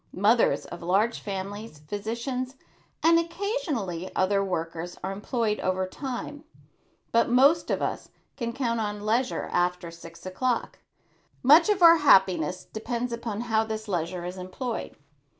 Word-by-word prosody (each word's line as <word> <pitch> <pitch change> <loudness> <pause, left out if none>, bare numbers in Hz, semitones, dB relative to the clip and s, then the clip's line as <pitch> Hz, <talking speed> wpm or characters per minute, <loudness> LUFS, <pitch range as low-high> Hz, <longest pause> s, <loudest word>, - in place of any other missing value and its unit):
Mothers 220 +5 +3
of 175 - -9
large 195 +7 +1
families, 200 -1 -6
physicians 235 - -3 0.5
and 330 +1 +6
occasionally 330 - -3
other 195 +1 +2
workers 170 -1 -4
are 190 - -2
employed 210 +2 -1
over 185 0 0
time; 270 +7 -6 0.7
but 230 +1 +3
most 280 +7 +4
of - - 0
us - - -3 0.3
can 235 -3 -3
count 235 -2 -1
on 205 -1 -3
leisure 235 +4 0
after 175 -1 0
six 170 +1 -13
o'clock. 240 +6 -2 0.6
Much 310 - +7
of 395 -4 +2
our 335 0 +9
happiness 185 - +4
depends 235 +2 -4
upon 230 -2 -4
how 220 -2 +1
this 220 0 -5
leisure 175 -1 -2
is 180 +1 -6
employed. 205 +7 -5
220 Hz, 135 wpm, -27 LUFS, 185-250 Hz, 0.7 s, our